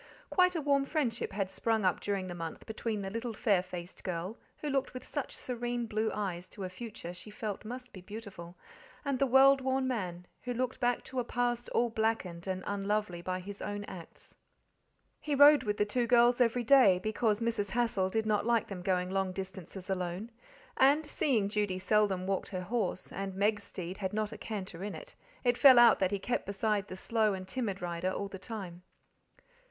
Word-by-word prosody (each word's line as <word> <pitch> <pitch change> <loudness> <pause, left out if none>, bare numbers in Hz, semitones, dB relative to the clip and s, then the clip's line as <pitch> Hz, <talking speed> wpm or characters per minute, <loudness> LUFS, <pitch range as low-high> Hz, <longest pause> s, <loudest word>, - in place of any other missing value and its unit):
Quite 365 -1 +4
a 325 - 0
warm 280 -1 +2
friendship 275 -6 -1
had 195 -1 -2
sprung 220 -2 0
up 185 - +2
during 200 -2 -2
the 180 - -5
month 165 -2 -6
between 220 -1 -3
the 195 - -4
little 230 +1 -4
fair 205 -5 +3
faced 180 0 -8
girl, 180 +5 -4 0.2
who 300 - -5
looked 270 -2 -1
with 255 - -7
such 290 -3 -4
serene 240 -1 -3
blue 220 0 0
eyes 185 -4 -3
to 200 - -8
a 185 - -3
future 200 -3 -7
she 180 +4 -8
felt 210 -1 -5
must 250 +3 -8
be 185 - -9
beautiful, 195 -4 -9 0.5
and 275 -2 0
the 275 - +3
world 270 +2 +6
worn 260 0 0
man, 180 -8 -3 0.2
who 245 -1 -4
looked 255 +1 -2
back 245 0 +1
to 260 - -4
a - - +1
past 240 0 -1
all 240 -1 +1
blackened 220 -6 -1
and 185 0 -2
unlovely 205 -3 -1
by 185 +1 -2
his 200 +2 -8
own 205 0 -3
acts. 180 -5 -11 0.8
He 295 -2 -1
rode 290 0 +8
with 210 -4 -2
the 210 - +2
two 235 +3 0
girls 240 +1 +5
every 240 0 +3
day, 235 -7 +6
because 215 +2 0
Mrs. 230 -3 -1
Hassal 210 -4 +1
did 220 +3 0
not 210 -1 +2
like 235 0 +2
them 190 -3 -5
going 180 0 0
long 190 -1 0
distances 190 -1 -7
alone; 185 +3 -3 0.5
and, 285 +4 +5
seeing 255 -8 +1
Judy 205 -3 -1
seldom 190 -1 +2
walked 195 0 -1
her 185 -2 -3
horse, 195 -2 -2
and 195 0 -4
Meg's 205 +1 +1
steed 185 +1 -6
had 190 0 -2
not 215 0 -1
a - - -7
canter 190 -5 -5
in 205 - -4
it, - - -10 0.3
it 245 -1 +2
fell 260 -1 +9
out 240 -1 +8
that 190 - +2
he 200 - -1
kept 240 +3 -2
beside 205 0 0
the 185 - -7
slow 215 +1 +1
and 185 0 -7
timid 200 -4 -3
rider 175 +1 -1
all 200 +1 -3
the 190 - -8
time. 190 -5 -6
210 Hz, 200 wpm, -31 LUFS, 190-240 Hz, 0.8 s, fell